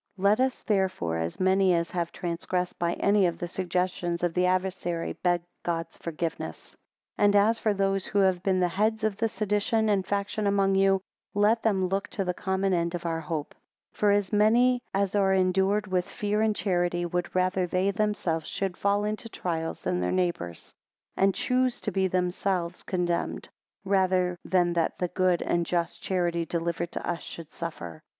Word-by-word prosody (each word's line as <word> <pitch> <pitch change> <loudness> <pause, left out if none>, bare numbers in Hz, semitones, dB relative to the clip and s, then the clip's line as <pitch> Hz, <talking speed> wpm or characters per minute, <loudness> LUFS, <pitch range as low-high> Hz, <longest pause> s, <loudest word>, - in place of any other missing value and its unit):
LET 200 +4 +3
us 260 0 0
therefore, 185 - 0
as 80 +1 -3
many 190 -1 +4
as 170 0 -1
have 170 -2 -2
transgressed 180 +1 -3
by 170 0 +1
any 200 -2 +3
of 170 -1 -3
the 175 - -4
suggestions 180 -1 -2
of 175 -1 +1
the 180 +1 +2
adversary, 180 -2 -1
beg 175 -1 +2 0.2
God's 165 -1 -3
forgiveness. 165 0 -5 0.5
2 - - +2
And 205 0 +4
as 215 +3 +4
for 215 - +1
those 195 -1 0
who 205 - -2
have 190 -3 +3
been 190 -1 +1
the 180 - +3
heads 215 +5 0
of 215 -2 +1
the 225 0 +1
sedition 215 +1 0
and 200 -2 +2
faction 200 +2 -1
among 195 -1 +2
you, 195 0 +3 0.3
let 210 +3 +3
them 195 -4 +2
look 195 +2 -1
to 195 - -3
the 180 - 0
common 190 +1 0
end 170 0 0
of 175 - -6
our 165 -1 -1
hope. 155 -2 -4 0.4
3 - - -23
For 210 - +4
as 205 0 +1
many 240 +4 +4
as 195 0 0
are 195 -2 +3
endued 190 +2 +2
with 185 -2 -1
fear 210 +1 -1
and 220 -1 +2
charity, 175 -3 0
would 175 +1 -3
rather 185 0 +1
they 185 +3 +1
themselves 190 -6 -1
should 190 -2 -3
fall 200 +1 +1
into 215 +2 -3
trials 165 -5 -3
than 90 0 0
their 90 0 0
neighbours: 170 - -2 0.4
And 195 0 +3
choose 255 -1 +1
to 210 - -2
be 190 0 +1
themselves 180 -1 -1
condemned, 175 -2 -2 0.4
rather 185 -2 +2
than 175 -2 +2
that 170 -1 0
the 180 - -1
good 185 -1 +1
and 170 - +1
just 170 0 -2
charity 175 -2 0
delivered 170 0 -2
to - - -4
us, 175 -1 -2
should 165 -2 -9
suffer. 85 - -7
185 Hz, 185 wpm, -27 LUFS, 175-200 Hz, 0.5 s, many